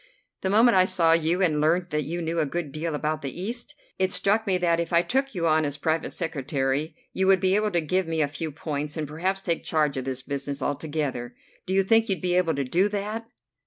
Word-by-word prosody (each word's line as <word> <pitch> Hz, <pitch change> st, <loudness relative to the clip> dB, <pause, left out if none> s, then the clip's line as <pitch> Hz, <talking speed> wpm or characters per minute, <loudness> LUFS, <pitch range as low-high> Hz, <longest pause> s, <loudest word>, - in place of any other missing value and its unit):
The 190 Hz, -, 0 dB
moment 225 Hz, +3 st, +5 dB
I 185 Hz, 0 st, +6 dB
saw 175 Hz, -3 st, +3 dB
you 165 Hz, +3 st, +2 dB
and 155 Hz, -4 st, +2 dB
learned 175 Hz, +3 st, +1 dB
that 150 Hz, -1 st, -1 dB
you 170 Hz, +3 st, -3 dB
knew 165 Hz, +1 st, -1 dB
a 155 Hz, -, +2 dB
good 165 Hz, -1 st, -3 dB
deal 155 Hz, +2 st, -3 dB
about 155 Hz, +1 st, -2 dB
the 140 Hz, +3 st, -5 dB
East, 240 Hz, +9 st, -3 dB, 0.2 s
it 190 Hz, 0 st, +1 dB
struck 210 Hz, +4 st, +1 dB
me 190 Hz, -2 st, +2 dB
that 170 Hz, -2 st, +1 dB
if 170 Hz, 0 st, -2 dB
I 170 Hz, 0 st, +4 dB
took 270 Hz, +1 st, -1 dB
you 170 Hz, -2 st, -1 dB
on 155 Hz, -1 st, +3 dB
as 145 Hz, -1 st, -2 dB
private 160 Hz, +2 st, 0 dB
secretary 150 Hz, -2 st, -2 dB, 0.2 s
you 190 Hz, 0 st, +1 dB
would 190 Hz, -1 st, +5 dB
be 185 Hz, +1 st, +2 dB
able 210 Hz, +1 st, +2 dB
to 175 Hz, -4 st, +1 dB
give 185 Hz, +3 st, 0 dB
me 165 Hz, -1 st, -1 dB
a 150 Hz, -, +3 dB
few 155 Hz, +2 st, -5 dB
points, 150 Hz, +1 st, -4 dB
and 155 Hz, -1 st, -2 dB
perhaps 185 Hz, +6 st, -2 dB
take 170 Hz, -3 st, -1 dB
charge 150 Hz, -3 st, +1 dB
of 130 Hz, -, -3 dB
this 130 Hz, -1 st, -4 dB
business 140 Hz, 0 st, -4 dB
altogether. 145 Hz, -4 st, -3 dB, 0.3 s
Do 190 Hz, -, -1 dB
you 195 Hz, -, +4 dB
think 225 Hz, +3 st, +3 dB
you'd 190 Hz, -3 st, +1 dB
be 180 Hz, +1 st, 0 dB
able 175 Hz, -3 st, +2 dB
to 140 Hz, -, -1 dB
do 180 Hz, +10 st, +2 dB
that?" 210 Hz, +2 st, -4 dB
165 Hz, 240 wpm, -26 LUFS, 150-190 Hz, 0.3 s, I